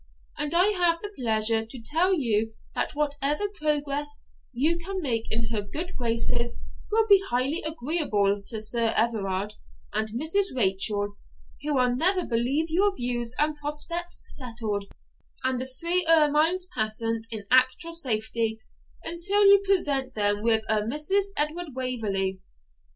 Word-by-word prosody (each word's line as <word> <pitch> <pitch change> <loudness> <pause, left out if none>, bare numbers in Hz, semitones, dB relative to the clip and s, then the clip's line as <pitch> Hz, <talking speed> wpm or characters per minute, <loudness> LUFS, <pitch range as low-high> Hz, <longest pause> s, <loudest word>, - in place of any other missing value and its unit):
And 295 +2 -2
I 365 +4 +5
have 350 -4 +2
the 415 0 -6
pleasure 225 -2 +2
to 225 +3 -10
tell 325 +11 +1
you 225 - +1 0.2
that - - -2
whatever 295 +5 +1
progress 295 -4 -1 0.3
you 305 +7 +1
can 380 +3 -5
make 235 -9 -1
in 225 0 -1
her 220 -2 -1
good 325 - -6
graces 235 0 -1 0.3
will 445 +1 +3
be 400 -2 +7
highly 260 +7 0
agreeable 280 -10 0
to 220 -1 -2
Sir 230 0 +2
Everard 205 -3 0 0.4
and 220 - -1
Mrs. 315 - 0
Rachel, 205 -1 0 0.4
who 295 0 -1
will 250 -1 +2
never 360 +6 +2
believe 250 +7 0
your 390 +4 +2
views 240 -2 -2
and 300 0 +1
prospects 335 +4 -4
settled, 225 -6 -4 0.6
and 260 -1 0
the 260 - -4
three 335 +7 +2
ermines 320 +3 +4
passant 225 0 -1
in 220 -3 -5
actual 260 +7 +3
safety, 225 -6 -1 0.4
until 385 +5 +3
you 400 0 +7
present 285 -10 0
them 205 -1 +1
with 225 0 +3
a 215 -1 +2
Mrs. 300 - 0
Edward 300 0 -1
Waverley. 205 -7 -1
260 Hz, 140 wpm, -26 LUFS, 225-330 Hz, 0.6 s, be